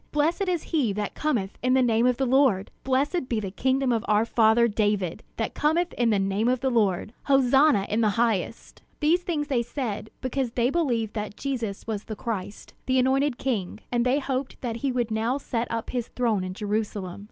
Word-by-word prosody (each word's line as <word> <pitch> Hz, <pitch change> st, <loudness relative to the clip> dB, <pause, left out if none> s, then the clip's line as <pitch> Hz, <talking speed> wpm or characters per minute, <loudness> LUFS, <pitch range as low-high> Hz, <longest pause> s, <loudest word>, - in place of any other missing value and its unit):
Blessed 330 Hz, +6 st, +1 dB
is 350 Hz, -3 st, 0 dB
he 260 Hz, -10 st, +2 dB
that 205 Hz, 0 st, -3 dB
cometh 235 Hz, -11 st, -2 dB
in 255 Hz, +1 st, +2 dB
the 260 Hz, -, +4 dB
name 230 Hz, 0 st, +3 dB
of 250 Hz, -1 st, +2 dB
the 270 Hz, -, +1 dB
Lord! 255 Hz, -7 st, +3 dB
Blessed 270 Hz, +3 st, 0 dB
be 230 Hz, -, 0 dB
the 195 Hz, -3 st, -4 dB
kingdom 260 Hz, +4 st, +1 dB
of 230 Hz, -2 st, 0 dB
our 210 Hz, +1 st, +3 dB
father 230 Hz, 0 st, +4 dB
David, 205 Hz, -5 st, 0 dB, 0.2 s
that -, -, -2 dB
cometh 335 Hz, +4 st, +1 dB
in 240 Hz, -1 st, +1 dB
the 210 Hz, -, +3 dB
name 195 Hz, +3 st, 0 dB
of 255 Hz, 0 st, +2 dB
the 265 Hz, +1 st, 0 dB
Lord! 210 Hz, -2 st, +1 dB
Hosanna 270 Hz, -4 st, +4 dB
in 220 Hz, +2 st, 0 dB
the 215 Hz, -, +3 dB
highest!" 230 Hz, -2 st, -1 dB, 0.2 s
These 330 Hz, +4 st, +3 dB
things 310 Hz, -5 st, -2 dB
they 260 Hz, -5 st, +1 dB
said, 235 Hz, -4 st, -4 dB
because 255 Hz, -2 st, -2 dB
they 245 Hz, +1 st, +1 dB
believed 240 Hz, -10 st, 0 dB
that 210 Hz, -1 st, -5 dB
Jesus 235 Hz, -8 st, -3 dB
was 215 Hz, -2 st, -4 dB
the 215 Hz, -, -5 dB
Christ, 205 Hz, -3 st, -5 dB
the 260 Hz, 0 st, +2 dB
Anointed 265 Hz, +1 st, +2 dB
King; 215 Hz, -7 st, -2 dB
and 240 Hz, -1 st, +2 dB
they 255 Hz, +3 st, +2 dB
hoped 265 Hz, -1 st, -3 dB
that 230 Hz, -3 st, -3 dB
he 270 Hz, +2 st, -1 dB
would 240 Hz, -3 st, -1 dB
now 225 Hz, +4 st, 0 dB
set 240 Hz, -4 st, -3 dB
up 230 Hz, 0 st, -3 dB
his 245 Hz, -2 st, -2 dB
throne 225 Hz, -6 st, 0 dB
in 185 Hz, 0 st, -5 dB
Jerusalem. 205 Hz, -3 st, -3 dB
240 Hz, 205 wpm, -26 LUFS, 215-270 Hz, 0.2 s, the